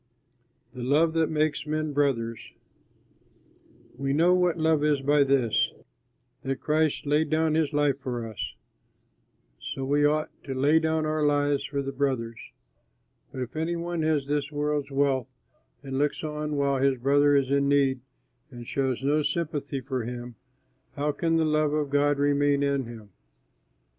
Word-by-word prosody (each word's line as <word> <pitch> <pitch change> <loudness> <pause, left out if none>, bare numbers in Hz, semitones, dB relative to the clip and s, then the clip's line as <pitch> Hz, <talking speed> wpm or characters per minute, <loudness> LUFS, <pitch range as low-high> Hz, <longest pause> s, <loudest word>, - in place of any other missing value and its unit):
THE 125 - -8
LOVE 150 +6 +2
THAT 165 -1 +1
MAKES 155 -1 0
MEN 155 0 -2
BROTHERS 115 -6 -1 1.5
We 135 0 0
know 170 +5 +4
what 180 -2 +2
love 160 -2 +2
is 150 -2 +2
by 145 +1 +4
this, 135 -5 +2 0.7
that 135 0 -2
Christ 155 -1 0
laid 150 +2 +1
down 160 0 +1
his 155 -2 +1
life 145 -2 +1
for 120 -4 -4
us; 110 - -6 1.0
so 135 - -5
we 145 +2 +2
ought 155 +1 +1
to 135 - -4
lay 145 +5 +4
down 160 -1 0
our 155 0 0
lives 145 -1 +2
for 140 0 -3
the 135 - -4
brothers. 130 -5 -2 0.9
But 130 - -4
if 120 - -10
any 160 +2 -1
one 170 0 -3
has 155 -3 +1
this 145 +1 -2
world's 150 -1 -1
wealth 135 -3 +1 0.6
and 135 0 -3
looks 145 +2 0
on 150 -1 -3
while 140 -2 +1
his 135 -1 +2
brother 145 +3 +3
is 135 -1 +1
in 140 0 +2
need 135 -2 +2 0.5
and 120 -3 -10
shows 130 0 -2
no 150 +2 +2
sympathy 145 -4 -2
for 130 0 -3
him, 120 +1 -6 0.6
how 150 +1 0
can 165 +2 0
the 160 - +2
love 155 -1 +1
of 150 -2 -1
God 145 0 +2
remain 145 0 +2
in 140 -2 0
him? 110 -4 -11
145 Hz, 160 wpm, -26 LUFS, 135-155 Hz, 1.5 s, know